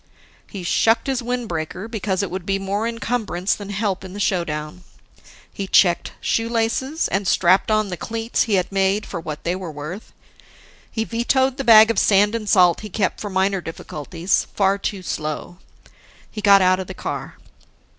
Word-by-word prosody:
He 195 -3 -7
shucked 225 +6 +2
his 265 -2 -1
windbreaker 215 -6 -4
because 205 -4 -2
it 195 - -4
would 185 0 -4
be 195 +2 0
more 200 +3 -2
encumbrance 230 -5 -1
than 205 -1 -7
help 200 -2 -2
in 185 -1 -9
the 205 - -7
showdown. 170 -4 -2 0.7
He 195 - -5
checked, 175 -3 +3
shoelaces, 230 +6 0
and 195 0 -1
strapped 185 +4 +3
on 215 -1 +1
the 180 - -4
cleats 225 +3 -1
he 215 -4 +1
had 185 0 0
made 195 +2 +1
for 175 - -5
what 155 -2 -7
they 175 +1 -1
were 185 -3 -6
worth. 155 +8 -8 0.8
He 220 - -1
vetoed 255 +3 +1
the 275 - -2
bag 225 -2 +8
of 225 - +1
sand 205 +1 +4
and 220 -3 -3
salt 180 -3 +5
he 215 - -8
kept 190 0 -1
for 205 - -4
minor 190 0 +1
difficulties 165 +2 -3
far 195 0 +2
too 195 -1 -4
slow. 155 +1 -4 0.7
He 215 - -6
got 200 -2 +6
out 185 0 +3
of 190 - -5
the 190 - -8
car. - - -6
195 Hz, 175 wpm, -21 LUFS, 180-225 Hz, 0.8 s, bag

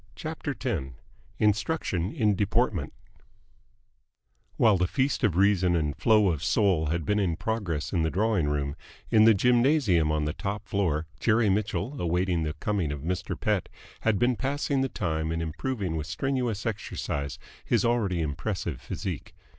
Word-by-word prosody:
CHAPTER 155 -3 -4
X 80 - -3 0.4
INSTRUCTION 105 - 0
IN 110 -9 +2
DEPORTMENT 105 - 0 1.7
While 110 -4 +5
the 90 - +2
feast 135 +6 0
of 100 -7 +2
reason 95 -3 +3
and 75 -3 0
flow 105 +1 +4
of 80 -3 -2
soul 95 -8 +2
had 85 +1 -1
been 105 0 +1
in 90 -5 +1
progress 85 -7 -2
in 85 - +2
the 80 - +1
drawing 100 -3 +1
room, 70 -1 -1 0.4
in 110 -1 +6
the 110 -1 +7
gymnasium 120 - +3
on 75 -1 0
the 75 - -2
top 100 +1 -4
floor 90 -8 0
Jerry 110 0 +3
Mitchell, 110 +7 -1
awaiting 90 0 +1
the 75 -1 -2
coming 90 -1 -1
of 75 -2 -5
Mr. 90 +3 -3
Pett, - - 0 0.3
had 110 -3 +1
been 120 +4 +2
passing 140 +1 -1
the 135 - 0
time 80 -5 -2
in 80 - -1
improving 90 - -3
with 80 -1 -3
strenuous 125 -6 -2
exercise 70 -9 -3 0.3
his - - +1
already 105 -8 +1
impressive 80 - -3
physique. - - -5
95 Hz, 155 wpm, -27 LUFS, 80-115 Hz, 1.7 s, the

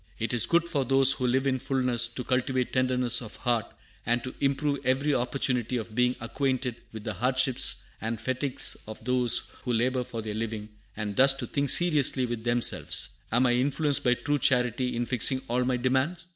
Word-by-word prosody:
"It 115 +2 -3
is 120 - +1
good 170 0 +1
for 150 -5 -1
those 135 +1 +6
who 130 -2 -1
live 130 +2 0
in 130 -1 0
fulness 125 -3 +2
to 115 +2 -7
cultivate 130 0 -2
tenderness 125 -2 +3
of 110 -3 -9
heart, 120 -3 -2 0.4
and 120 +1 -1
to 130 - -7
improve 140 +1 -1
every 135 +4 0
opportunity 125 -1 -1
of 110 -1 -7
being 125 +2 +1
acquainted 130 0 -3
with 110 -2 -9
the 110 - -4
hardships 130 +4 +1 0.2
and 110 +1 -4
fatigues 130 +3 0
of 110 0 -10
those 125 -1 +2
who 125 - -4
labor 125 +2 0
for 115 -2 -7
their 110 -1 -5
living, 110 -1 -5 0.3
and 105 -2 -5
thus 135 +1 +6
to 135 - -6
think 140 -1 -2
seriously 145 -6 +4
with 120 -2 -5
themselves: 120 0 +1 0.2
Am 120 +3 +2
I 120 - +2
influenced 140 +3 0
by 125 0 +2
true 145 +3 -2
charity 125 -1 +1
in 120 +1 -2
fixing 130 +2 +2
all 125 +2 -1
my 125 0 0
demands? 130 +8 -1
125 Hz, 190 wpm, -26 LUFS, 120-135 Hz, 0.4 s, those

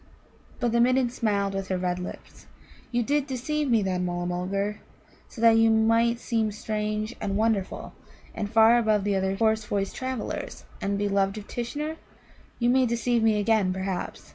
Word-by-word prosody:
But 240 -2 0
the 235 0 +3
Midden 255 0 +3
smiled 200 -5 0
with 195 -1 -3
her 185 - -1
red 180 0 -1
lips. 180 - -9 0.4
"You 240 -1 +1
did 285 +3 0
deceive 285 +3 -2
me, 225 -4 +3
then, 185 -1 -1
Mulla 175 0 -2
mulgar, 195 +4 -2 0.5
so 225 - -10
that 230 -1 +6
you 225 0 +5
might 230 +1 +3
seem 225 -3 0
strange 215 +1 -3
and 195 -1 -1
wonderful, 215 -3 -1 0.4
and 205 - -3
far 225 +2 +6
above 215 -3 +2
the 205 0 0
other 190 0 0
hoarse 220 +1 +2
voiced 200 -1 -2
travellers, 260 -3 -5
the 195 - -2
beloved 200 0 0
of 210 - -8
Tishnar? 295 +7 -4 0.6
You 240 0 +1
may 260 0 +3
deceive 235 0 +1
me 220 -1 +3
again, 210 -3 +2
perhaps. 190 -1 -4
220 Hz, 170 wpm, -26 LUFS, 195-235 Hz, 0.6 s, that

